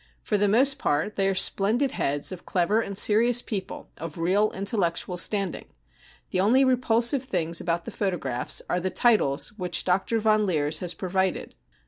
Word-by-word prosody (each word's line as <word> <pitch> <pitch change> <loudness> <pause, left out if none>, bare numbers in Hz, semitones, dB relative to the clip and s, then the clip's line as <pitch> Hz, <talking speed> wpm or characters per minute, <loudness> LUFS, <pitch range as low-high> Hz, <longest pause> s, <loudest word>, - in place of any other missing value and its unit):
For 210 - -1
the 205 0 +2
most 265 +7 +3
part 150 +8 -1
they 195 -1 +1
are 195 - 0
splendid 220 +8 +3
heads 145 +4 -1
of 185 -2 -9
clever 190 +5 0
and 200 -3 -5
serious 235 +4 +4
people 195 -3 -6
of 165 0 -7
real 190 +6 +1
intellectual 190 -3 -2
standing. 195 +2 -1 0.7
The 185 - -1
only 245 +8 +3
repulsive 245 0 +2
things 170 -7 -2
about 170 0 -2
the - - -7
photographs 155 - -3
are 180 - -1
the 185 +1 -2
titles 185 - +1
which 180 -1 0
Dr. 190 +5 0
Von 215 -1 +2
Leers 155 -3 0
has 180 -1 -3
provided. 190 0 -2
195 Hz, 165 wpm, -25 LUFS, 175-220 Hz, 0.7 s, serious